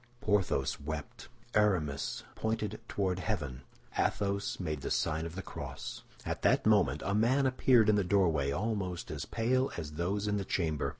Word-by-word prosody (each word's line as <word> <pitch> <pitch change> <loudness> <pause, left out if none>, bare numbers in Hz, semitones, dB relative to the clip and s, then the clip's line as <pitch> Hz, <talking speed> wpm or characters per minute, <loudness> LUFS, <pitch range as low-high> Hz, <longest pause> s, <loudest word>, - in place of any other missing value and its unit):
Porthos 95 - +1
wept; 75 0 -6 0.3
Aramis 85 -10 +1
pointed 110 -1 -2
toward 95 -2 -1
heaven; 70 -7 -3 0.3
Athos 100 -1 0
made 75 -6 -3
the - - -3
sign 80 +1 0
of 85 - -9
the 95 - -5
cross. - - -6 0.2
At - - -3
that - - +3
moment 70 +4 +3
a 100 - 0
man 120 +6 +3
appeared 130 -3 +4
in 105 -1 +5
the 100 - +3
doorway, 85 -7 +2
almost 95 0 -2
as - - -4
pale 130 +4 +1
as 80 -3 -4
those 95 +6 -1
in 105 0 +1
the 100 - -1
chamber. 80 -5 0
95 Hz, 165 wpm, -32 LUFS, 80-105 Hz, 0.3 s, in